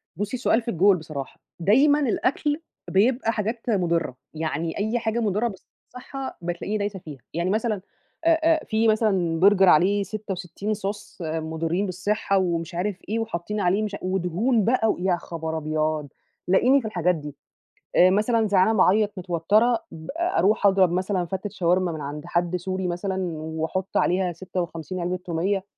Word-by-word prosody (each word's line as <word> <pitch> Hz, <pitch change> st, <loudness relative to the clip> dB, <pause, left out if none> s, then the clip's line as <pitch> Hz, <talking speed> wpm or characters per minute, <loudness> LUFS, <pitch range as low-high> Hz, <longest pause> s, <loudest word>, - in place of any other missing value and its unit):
بُصّي، 205 Hz, +7 st, -3 dB
سؤال 240 Hz, -1 st, +2 dB
في 235 Hz, 0 st, -3 dB
الجول 190 Hz, +1 st, +4 dB
بصراحة. 155 Hz, -4 st, -7 dB, 0.2 s
دايمًا 270 Hz, -, +4 dB
الأكل 290 Hz, +3 st, 0 dB, 0.3 s
بيبقى 225 Hz, +4 st, +2 dB
حاجات 225 Hz, +3 st, -3 dB
مُضِرّة، 170 Hz, -, 0 dB, 0.2 s
يعني 160 Hz, +1 st, -3 dB
أي 220 Hz, +4 st, 0 dB
حاجة 225 Hz, +1 st, -1 dB
مضرة 215 Hz, +1 st, +1 dB
بالصِحّة 250 Hz, +5 st, -9 dB
بتلاقيني 175 Hz, +5 st, -3 dB
دايسة 205 Hz, -1 st, -3 dB
فيها. 150 Hz, -5 st, -10 dB
يعني 170 Hz, +3 st, -1 dB
مثلًا 215 Hz, -1 st, 0 dB, 0.4 s
آآ 330 Hz, -1 st, +5 dB
آآ 320 Hz, -1 st, +3 dB
في 220 Hz, +1 st, +1 dB
مثلًا 195 Hz, -7 st, +2 dB
burger 205 Hz, -2 st, 0 dB
عليه 190 Hz, +5 st, +5 dB
66 195 Hz, 0 st, -4 dB
صوص 205 Hz, 0 st, -5 dB
مُضرّين 160 Hz, +3 st, -2 dB
بالصِحّة 195 Hz, +2 st, 0 dB
ومش 170 Hz, -2 st, -1 dB
عارف 185 Hz, +2 st, -1 dB
إيه 225 Hz, +2 st, 0 dB
وحاطّين 210 Hz, -1 st, -3 dB
عليه 195 Hz, +2 st, +2 dB
مش 210 Hz, -1 st, -3 dB
ودهون 190 Hz, +6 st, +1 dB
بقى 230 Hz, -1 st, +2 dB
و -, -, 0 dB
يا 180 Hz, 0 st, +1 dB
خبر 160 Hz, -2 st, -5 dB
أبيض، 155 Hz, -1 st, -1 dB, 0.4 s
تلاقيني 250 Hz, +9 st, +4 dB
في 225 Hz, -, -5 dB
الحاجات 180 Hz, -4 st, +1 dB
دي. 150 Hz, -2 st, -8 dB, 0.6 s
آآ 180 Hz, -, +7 dB
مثلًا 215 Hz, +3 st, +2 dB
زعلانة، 200 Hz, +2 st, +3 dB
باعيّط، 205 Hz, +3 st, +4 dB
متوتَّرة، 195 Hz, +7 st, +2 dB
ب 160 Hz, 0 st, -10 dB
أروح 340 Hz, -, +2 dB
أضرب 190 Hz, -3 st, +4 dB
مثلًا 185 Hz, 0 st, 0 dB
فَتّة 190 Hz, +4 st, -4 dB
شاورما 180 Hz, 0 st, +1 dB
من 160 Hz, -2 st, -6 dB
عند 145 Hz, +2 st, -6 dB
حد 175 Hz, 0 st, 0 dB
سوري 185 Hz, +1 st, -2 dB
مثلًا 185 Hz, +2 st, -2 dB, 0.2 s
وأحُط 160 Hz, +4 st, -3 dB
عليها 180 Hz, 0 st, +2 dB
56 175 Hz, 0 st, -5 dB
عِلبة 180 Hz, +1 st, -1 dB
توميّة. 185 Hz, +3 st, -1 dB
190 Hz, 155 wpm, -24 LUFS, 170-215 Hz, 0.6 s, آآ